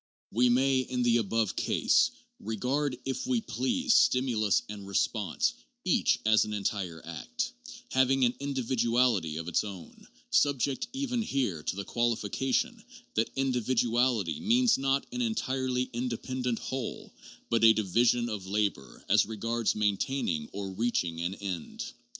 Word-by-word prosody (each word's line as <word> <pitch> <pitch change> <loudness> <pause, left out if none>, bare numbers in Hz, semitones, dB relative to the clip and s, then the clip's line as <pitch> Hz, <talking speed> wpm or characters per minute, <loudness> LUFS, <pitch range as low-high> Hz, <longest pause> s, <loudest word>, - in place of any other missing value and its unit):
We 125 +2 +3
may, 130 +2 +3
in 125 -1 -1
the 120 -1 +4
above 115 -1 0
case, - - +3 0.3
regard, 125 +5 -1
if 135 - -3
we 255 -2 +2
please, 255 +3 0
stimulus 115 -5 +3
and 100 -2 -8
response 100 -1 0 0.3
each - - +3
as 110 0 +5
an 105 - -5
entire 95 -5 -3
act, 85 -2 -4 0.4
having 130 0 +3
an 120 - +2
individuality 120 - +1
of 80 +1 -5
its 85 - +1
own, 100 -5 -10 0.2
subject 140 -1 +2
even 260 -2 -1
here 125 - -1
to 80 - -3
the 100 0 -5
qualification 125 - -1 0.3
that 110 +1 +1
individuality 120 -6 +1
means 240 +2 +4
not 135 +1 0
an 250 0 -3
entirely 130 - 0
in 120 +2 -2
dependent 125 0 -2
whole, 130 -3 -5 0.4
but 115 -1 +2
a 115 - +9
division 115 +3 +2
of 105 -5 -5
labor 100 -8 -2
as 105 0 +4
regards 115 +1 -1
maintaining 105 - -1
or 100 -1 -5
reaching 95 -6 -1
an 90 +3 -2
end. 95 -6 -5
120 Hz, 140 wpm, -29 LUFS, 105-130 Hz, 0.4 s, a